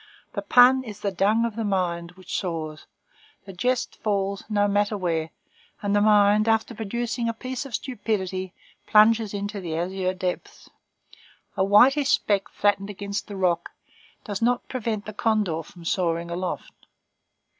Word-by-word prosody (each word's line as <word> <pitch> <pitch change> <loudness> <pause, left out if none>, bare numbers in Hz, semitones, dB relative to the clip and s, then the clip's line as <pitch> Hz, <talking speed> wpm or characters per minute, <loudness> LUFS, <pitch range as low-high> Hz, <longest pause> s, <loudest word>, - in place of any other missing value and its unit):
The - - -3
pun 255 +1 +6
is 210 -4 -9
the 200 - -1
dung 210 +5 +2
of 230 -3 -4
the 225 - -2
mind 180 -4 -1
which 185 0 -7
soars. 160 -4 -4 0.6
The 195 - -9
jest 250 +7 -1
falls, 200 -2 -1
no 205 -1 +2
matter 205 +1 +1
where; 165 -4 -1 0.5
and 205 0 +1
the 205 - +4
mind 210 0 +4
after 225 +1 +1
producing 235 +2 -2
a 230 - -3
piece 255 +3 -5
of 245 - -4
stupidity 190 -7 -3 0.4
plunges 215 0 +5
into 205 0 -4
the 165 -3 -4
azure 185 +2 -2
depths. 180 -1 -5 0.8
A 190 - +2
whitish 260 +8 +5
speck 205 -9 +1
flattened 205 -1 0
against 200 0 -5
the 205 - -7
rock 180 -3 0 0.5
does 205 -2 -5
not 245 +1 +1
prevent 225 -4 -3
the 215 - -7
condor 210 -7 0
from 170 +2 -14
soaring 170 -1 -1
aloft. 180 +1 -5
205 Hz, 155 wpm, -25 LUFS, 185-225 Hz, 0.8 s, pun